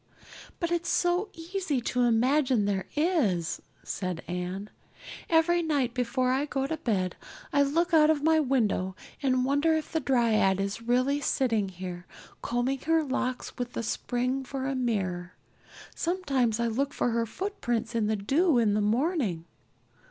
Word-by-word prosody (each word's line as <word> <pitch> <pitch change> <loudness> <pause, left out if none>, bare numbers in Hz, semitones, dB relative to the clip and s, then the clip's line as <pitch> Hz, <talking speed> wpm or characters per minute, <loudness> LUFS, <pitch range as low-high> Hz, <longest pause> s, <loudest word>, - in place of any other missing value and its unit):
"But 340 -1 -1
it's 345 0 0
so 355 +3 +1
easy 330 -4 -2
to 245 +1 -1
imagine 245 0 +3
there 195 -2 -1
is," 290 - +1 0.2
said 185 -3 -4
Anne. 180 +3 -4 0.6
"Every 340 +1 +4
night 285 -7 0
before 250 +1 0
I 270 +3 +1
go 270 -2 -2
to 315 +3 -2
bed, 190 - -1 0.4
I 285 - +4
look 335 +6 +1
out 310 -1 +6
of 300 -2 +2
my 320 0 +4
window 220 -9 +1 0.3
and 255 -2 +2
wonder 285 +4 +2
if 315 -1 -3
the 320 - +1
dryad 230 -8 +2
is 200 +3 -2
really 255 +5 +1
sitting 230 -7 +1
here, 180 -1 -7 0.3
combing 245 +3 -1
her 325 +2 +2
locks 255 -2 -3
with 245 0 -3
the - - -3
spring 250 +4 -1
for 265 0 -4
a 275 - -1
mirror. 190 -8 -2 0.6
Sometimes 275 - 0
I 235 - +1
look 265 +5 -1
for 245 - +1
her 230 0 0
footprints 240 - -3
in 225 -2 +1
the 220 - +1
dew 275 - +2
in 220 -3 +3
the 210 - +1
morning. 220 - 0
255 Hz, 160 wpm, -28 LUFS, 215-300 Hz, 0.6 s, out